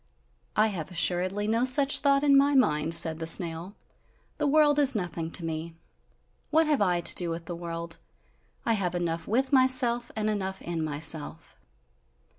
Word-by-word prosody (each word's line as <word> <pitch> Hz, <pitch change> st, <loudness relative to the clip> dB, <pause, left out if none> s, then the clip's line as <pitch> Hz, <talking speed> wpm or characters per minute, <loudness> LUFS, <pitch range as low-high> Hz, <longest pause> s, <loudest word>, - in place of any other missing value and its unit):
"I 215 Hz, +1 st, +2 dB
have 170 Hz, -7 st, -6 dB
assuredly 185 Hz, +3 st, 0 dB
no 225 Hz, +2 st, 0 dB
such 275 Hz, +2 st, +5 dB
thought 280 Hz, 0 st, +1 dB
in 285 Hz, -1 st, +4 dB
my 280 Hz, +1 st, +3 dB
mind," 160 Hz, -, +1 dB
said 160 Hz, -1 st, +1 dB
the 160 Hz, -, -5 dB
snail, 170 Hz, +2 st, +1 dB, 0.6 s
"the 295 Hz, -, 0 dB
world 295 Hz, 0 st, +3 dB
is 275 Hz, -3 st, +4 dB
nothing 170 Hz, -4 st, -4 dB
to 165 Hz, 0 st, -3 dB
me! 160 Hz, +1 st, -6 dB, 0.7 s
What 320 Hz, +1 st, +2 dB
have 300 Hz, -5 st, 0 dB
I 180 Hz, -3 st, 0 dB
to -, -, +4 dB
do 175 Hz, -2 st, -1 dB
with 165 Hz, 0 st, -6 dB
the 175 Hz, -, -6 dB
world? 170 Hz, -1 st, -7 dB, 0.7 s
I 230 Hz, -, +1 dB
have 180 Hz, -4 st, -2 dB
enough 165 Hz, -1 st, -4 dB
with 265 Hz, +6 st, -1 dB
myself, 255 Hz, -2 st, +3 dB
and 215 Hz, -1 st, -3 dB
enough 190 Hz, -2 st, -4 dB
in 170 Hz, -2 st, -4 dB
myself!" 155 Hz, +1 st, -3 dB
185 Hz, 170 wpm, -26 LUFS, 165-255 Hz, 0.7 s, such